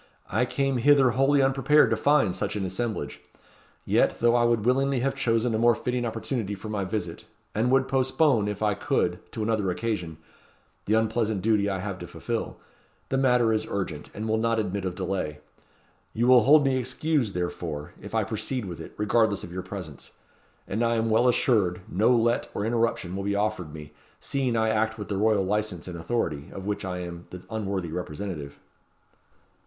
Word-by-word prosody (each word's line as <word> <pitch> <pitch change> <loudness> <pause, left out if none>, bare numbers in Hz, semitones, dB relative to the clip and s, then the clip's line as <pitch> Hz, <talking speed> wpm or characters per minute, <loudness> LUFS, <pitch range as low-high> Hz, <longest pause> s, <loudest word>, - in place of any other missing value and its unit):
I - - +2
came 135 -1 0
hither 135 0 +5
wholly 135 +3 +3
unprepared 135 +3 +4
to - - +3
find 140 -11 +3
such - - -2
an 100 -2 -2
assemblage. 95 - -3 0.6
Yet, - - +2
though 120 0 +4
I 120 -1 +3
would 115 -2 +1
willingly 135 +1 +2
have 135 +1 0
chosen 115 -3 +1
a 110 - 0
more 120 0 +5
fitting 125 +1 -2
opportunity 110 -2 -3
for 105 +3 -8
my 105 -2 -2
visit, 90 -4 -4 0.3
and 115 +4 +1
would 130 0 +3
postpone, 130 -3 +2
if 105 0 -3
I 105 -1 +2
could, 100 -5 0
to 110 - -3
another 105 -3 0
occasion, 90 -4 -3 0.7
the 105 - +2
unpleasant 110 -2 0
duty 105 -2 +2
I 95 - -1
have 95 0 -5
to - - -7
fulfil; - - -4 0.5
the 135 - 0
matter 125 -4 +3
is 110 0 -1
urgent, 90 -7 -4
and 110 +2 -4
will 110 0 +1
not 115 0 +1
admit 100 -2 -2
of 90 -1 -3
delay. 90 -6 -3 0.8
You 115 - +1
will 125 -2 +6
hold 145 +1 +6
me 135 -1 +2
excused, 130 - 0
therefore, 85 -4 -4
if - - -7
I - - +2
proceed 125 -5 -3
with 85 -3 -7
it, - - -10
regardless 105 0 +2
of 85 - -8
your 95 - -3
presence; 90 -8 -8 0.6
and 110 +5 -1
I 115 0 +2
am 115 0 0
well 115 +3 +4
assured 105 -8 +2
no 105 +6 +2
let 120 -1 +2
or 100 - -1
interruption 115 -6 0
will 100 - -3
be 100 0 -1
offered 100 -6 -1
me, 75 -1 -10 0.3
seeing 130 -4 -1
I 110 0 +2
act 110 +1 0
with 105 - -7
the 100 - -1
royal 105 -1 +3
licence 105 -3 -2
and 90 - -6
authority, 85 -5 -2
of 95 - -8
which 105 0 -2
I 90 -1 -3
am 85 -1 -8
the 90 0 -9
unworthy 100 -6 -3
representative." 80 -3 -5
110 Hz, 190 wpm, -26 LUFS, 95-120 Hz, 0.8 s, will